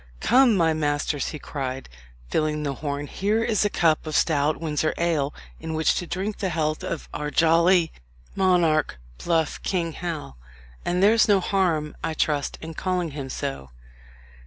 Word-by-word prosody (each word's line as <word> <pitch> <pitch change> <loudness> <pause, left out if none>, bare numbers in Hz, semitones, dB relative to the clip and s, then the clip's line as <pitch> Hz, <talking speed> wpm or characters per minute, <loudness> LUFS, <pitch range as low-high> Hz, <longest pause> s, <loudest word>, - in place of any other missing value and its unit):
"Come, 250 - +4
my 165 -2 +3
masters!" 145 -2 -1
he 155 - -5
cried, 135 -3 -5 0.4
filling 150 - 0
the 140 -2 -1
horn, 145 0 -4
"here 210 +8 0
is 220 -4 +1
a 205 - +2
cup 160 -4 +1
of 155 - -3
stout 150 -1 +2
Windsor 155 -1 -1
ale 160 -5 0 0.3
in 160 0 -5
which 160 0 +3
to 175 - -3
drink 190 +5 -3
the 190 - -1
health 155 -2 -1
of 165 - -4
our 150 0 -3
jolly 170 +2 +4 0.4
monarch, 170 - +2 0.3
bluff 165 -3 0
King 170 -3 -1
Hal; 155 - -5 0.5
and 180 +2 0
there's 220 +2 +5
no 205 -2 +5
harm, 175 -6 0
I 160 - -2
trust, 145 -2 0
in 160 0 -7
calling 180 -1 -2
him 140 -2 -6
so." 135 - -5
160 Hz, 160 wpm, -24 LUFS, 150-180 Hz, 0.5 s, there's